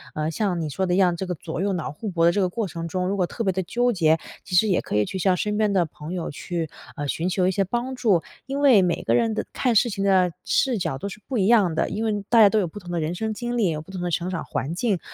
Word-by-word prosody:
呃， 155 +1 -1
像 185 0 -1
你 155 - -3
说 170 +7 -1
的 180 - 0
一 - - +1
样， 185 -2 +4
这 190 - -3
个 180 - -2
左 160 +1 -6
右 200 0 0
脑 175 -4 -3
互 205 +9 -6
搏 170 -3 +2
的 170 - +6
这 205 - -1
个 185 - +3
过 215 +3 -2
程 165 0 -5
中， 180 +1 -2
如 200 +2 -1
果 185 - +2
特 230 - -4
别 195 - +2
地 190 - -1
纠 245 +7 +1
结， 160 -6 +3 0.3
其 180 - -4
实 215 +5 +5
也 190 - +2
可 - - -4
以 105 - +4
去 190 - -5
向 185 +1 +3
身 210 +2 -1
边 215 -1 +2
的 180 -3 +3
朋 155 +2 -8
友 175 -3 -3
去， 165 +1 -4 0.3
呃， 145 - -4
寻 165 +5 -1
求 185 0 +1
一 - - +3
些 195 +1 +1
帮 240 +7 -3
助。 210 -9 +2 0.2
因 275 +2 -3
为 265 -8 +6
每 175 -2 0
个 - - +2
人 230 -2 +2
的 - - -1
看 245 -3 +1
事 240 +3 +4
情 195 -2 -3
的 190 -2 +3
视 255 -4 +2
角 165 -8 -2
都 200 - -4
是 205 - -10
不 260 -3 -2
一 190 - +2
样 210 -7 +4
的， 165 - 0
因 215 +2 -3
为 210 -2 -1
大 235 - +5
家 210 - +9
都 215 - +2
有 190 - 0
不 190 +6 -9
同 175 -3 -9
的 175 - -1
人 160 +1 -2
生 220 +3 -2
经 240 +2 -3
历， 210 -6 +2
有 155 -1 -3
不 155 - -17
同 190 - -6
的 175 0 -2
成 175 +2 -1
长 185 -3 -3
环 145 +5 -3
境。 200 -1 0
190 Hz, 340 characters per minute, -24 LUFS, 170-215 Hz, 0.3 s, 家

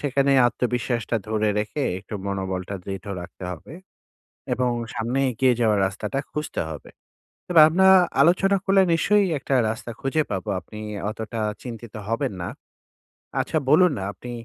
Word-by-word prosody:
সেখানে 140 -1 +2
আত্মবিশ্বাসটা 120 -1 -1
ধরে 110 -1 +1
রেখে, 110 +8 -2 0.2
একটু 105 +3 -9
মনোবলটা 95 -1 -3
দৃঢ় 95 +1 -6
রাখতে 90 +1 -9
হবে 90 - -9 0.8
এবং 125 -1 0 0.2
সামনে 120 +4 -1
এগিয়ে 125 +1 +2
যাওয়ার 110 -3 +3
রাস্তাটা 100 +7 -4
খুঁজতে 150 +1 -3
হবে। 75 - -9 0.6
তবে 170 -3 +6
আমরা 190 +4 +4 0.3
আলোচনা 185 +6 +4
করলে 195 0 +5
নিশ্চয়ই 200 +4 +3
একটা 135 - -1
রাস্তা 115 +2 -5
খুঁজে 135 +4 +1
পাবো। 100 +2 -3
আপনি 105 +5 -11 0.3
অতটা 110 +1 -5 0.2
চিন্তিত 120 -3 -8
হবেন 115 -2 -1
না। 85 - -3 0.9
আচ্ছা, - - 0
বলুন 175 +5 +6
না! 95 - -4
আপনি 125 - -9
120 Hz, 140 wpm, -24 LUFS, 105-145 Hz, 0.9 s, তবে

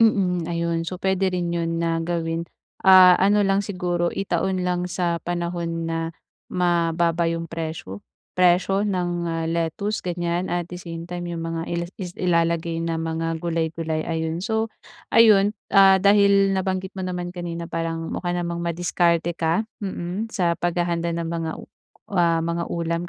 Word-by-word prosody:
Mm, 185 -6 +3
ayun. 170 0 -1
So, 180 +2 -6
puwede 190 -1 +1
rin 175 -1 -1
'yun 165 0 -1
na 165 0 0
gawin, 165 -1 -2 0.4
ah, 185 -1 +9
ano 205 +2 +3
lang 195 0 +2
siguro 175 -3 -1
itaon 185 0 -1
lang 180 0 0
sa 175 -1 -1
panahon 170 -1 -2
na 165 0 -2 0.4
mababa 170 -1 +1
yung 165 0 -2
presyo, 160 - -6 0.3
presyo 185 +3 +3
ng, 180 -3 0
ah, 165 -1 -2
lettuce 170 +6 -2
ganyan 175 0 -2
at 175 -1 -2
the 180 - -7
same 170 -1 -7
time 175 0 -5
yung 165 - -4
mga 165 0 -3 0.3
is 180 -3 -6
ilalagay 170 -2 0
ng 165 - -1
mga 165 0 -2
gulay-gulay, 160 -1 -2
ayun. 165 +2 -2
So 220 0 0 0.4
ayun, 210 -2 +5 0.2
ah, 195 -1 +7
dahil 200 0 +4
nabanggit 190 0 -2
mo 190 - -7
naman 180 -1 -4
kanina 170 -1 -5
parang 165 0 -3
mukha 175 -1 -2
namang 170 -1 -2
madiskarte 170 0 +1
ka, 165 +5 0 0.2
mm, 190 +2 -4
sa 175 -5 +1
paghahanda 170 -1 0
ng 170 - -2
mga, 165 -1 -2 0.6
ah, 170 -3 +2
mga 170 0 -2
ulam 170 +1 -2
175 Hz, 150 wpm, -23 LUFS, 165-185 Hz, 0.6 s, ah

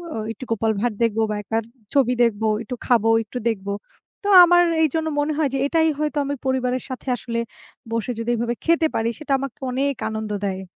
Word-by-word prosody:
ও - - -3
একটু 240 - -9
গোপাল 225 0 +1
ভাঁড় 235 -1 0
দেখবো 225 -1 +1
বা, 210 - -1
একবার 225 +2 -2 0.3
ছবি 255 -3 +3
দেখবো। 220 -2 +1 0.2
একটু 250 - -5
খাবো, 225 -2 +3
একটু 220 +3 -8
দেখবো। 200 -2 -3 0.5
তো 405 - -3 0.2
আমার 350 0 +6 0.2
এইজন্য 320 +1 0
মনে 295 +1 0
হয় 300 -3 +2
যে, - - +1
এটাই 320 +1 +3
হয়তো 300 0 -1
আমি 285 +1 -2
পরিবারের 255 -1 0
সাথে 260 +1 -7
আসলে 230 -1 -4 0.5
বসে 230 +1 -1
যদি 230 +1 -3
এভাবে 235 +1 -1
খেতে 330 -1 +3
পারি। 225 +1 +1
সেটা 305 -2 -6
আমাকে 275 -2 -6
অনেক 275 +2 0
আনন্দ 220 -1 -4
দেয়। 190 -1 -2
245 Hz, 195 wpm, -22 LUFS, 225-285 Hz, 0.5 s, আমার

